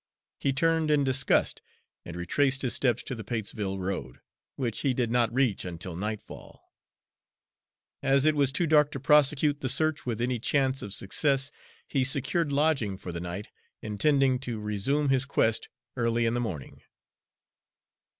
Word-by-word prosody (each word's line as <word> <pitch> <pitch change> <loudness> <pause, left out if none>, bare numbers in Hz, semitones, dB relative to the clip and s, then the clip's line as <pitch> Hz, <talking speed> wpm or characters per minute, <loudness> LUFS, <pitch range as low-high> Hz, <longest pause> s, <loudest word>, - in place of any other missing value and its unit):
He 135 - +1
turned 160 +3 +1
in 150 -1 +3
disgust 135 0 +1 0.4
and 85 - -8
retraced 135 +10 +1
his 125 - 0
steps 125 -3 +1
to - - -5
the 115 -2 -6
Patesville 105 -3 -3
road, 90 -9 -4 0.4
which 120 -5 -2
he 135 -3 0
did 120 -2 0
not 120 -2 +2
reach 125 -5 +1
until 85 -1 -6
nightfall. 105 +3 -7 1.3
As 135 +1 +3
it 155 -1 +4
was 140 -2 +3
too 170 +5 0
dark 150 -2 +4
to 135 - -4
prosecute 145 +1 +3
the 130 - -1
search 155 +3 +1
with 120 -3 -3
any 120 0 -1
chance 135 +2 +1
of 100 - -7
success, 135 +8 +1 0.4
he 135 - +1
secured 145 +5 0
lodging 140 -9 +1
for 90 - -7
the 85 0 -5
night, 90 +4 -6 0.3
intending 130 +4 +2
to 120 -4 -5
resume 105 +8 0
his 135 0 +2
quest 115 -5 +1 0.3
early 115 -1 +1
in 115 - +1
the 120 - 0
morning. 90 - -5
130 Hz, 160 wpm, -28 LUFS, 105-140 Hz, 1.3 s, it